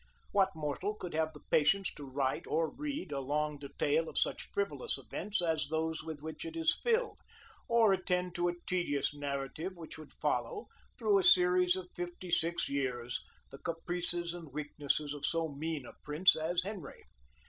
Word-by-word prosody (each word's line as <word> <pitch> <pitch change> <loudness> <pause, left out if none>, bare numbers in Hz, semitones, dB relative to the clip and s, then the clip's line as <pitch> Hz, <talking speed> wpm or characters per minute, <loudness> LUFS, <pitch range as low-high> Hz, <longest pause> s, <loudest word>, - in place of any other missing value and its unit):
What 195 -3 +3
mortal 160 +7 -2
could 180 -4 -6
have 160 0 +1
the 150 - -13
patience 195 +5 +4
to 145 -2 -9
write 130 0 0
or 160 -1 +1
read 290 - -4
a 140 - -1
long 150 +2 -1
detail 145 +3 0
of - - -5
such - - 0
frivolous 410 +3 -1
events 210 -3 +1
as 160 -3 +1
those 160 +1 -1
with 155 -2 -6
which 160 0 -5
it 330 0 -5
is 325 0 +3
filled, 470 0 +1 0.5
or 230 -4 +5
attend 180 -1 0
to 175 0 +1
a 175 - -2
tedious 170 -7 0
narrative 145 +5 -3
which 160 -1 -8
would 155 - -11
follow, 440 -3 -1 0.3
through 215 -4 +4
a - - +1
series 180 0 +6
of 185 -1 -5
fifty 175 0 -5
six 170 0 +2
years, 125 -3 -1 0.3
the 135 - -10
caprices 175 0 -1
and 165 -5 -8
weaknesses 145 0 -1
of 145 -1 -8
so 165 +2 +1
mean 150 -1 -3
a - - -10
prince 155 +5 +4
as 170 +3 0
Henry? 190 -7 -7
165 Hz, 175 wpm, -33 LUFS, 150-185 Hz, 0.5 s, series